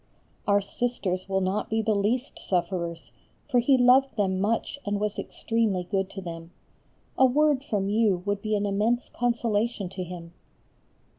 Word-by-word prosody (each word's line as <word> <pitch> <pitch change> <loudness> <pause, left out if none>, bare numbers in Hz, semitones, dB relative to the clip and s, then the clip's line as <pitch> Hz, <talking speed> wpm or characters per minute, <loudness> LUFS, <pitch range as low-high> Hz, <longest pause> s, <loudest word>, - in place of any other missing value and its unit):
Our 200 0 +4
Sisters 200 -4 -2
will 190 0 +1
not 190 +3 -1
be 220 0 0
the 215 0 +2
least 225 +6 -1
sufferers, 170 -2 -2 0.4
for 245 - +3
he 260 +3 +4
loved 250 0 +4
them 190 -2 +1
much 225 +7 -1
and 205 0 -1
was 210 0 -2
extremely 225 -5 -1
good 190 +1 -1
to 195 - -7
them. 165 -2 -7 0.7
A 260 - +8
word 290 +1 +2
from 205 -8 -1
you 205 -4 +2
would 205 0 -1
be 215 0 0
an 205 0 0
immense 215 +5 0
consolation 230 -4 0
to 185 0 -5
him. 170 -1 -9
205 Hz, 160 wpm, -26 LUFS, 190-235 Hz, 0.7 s, A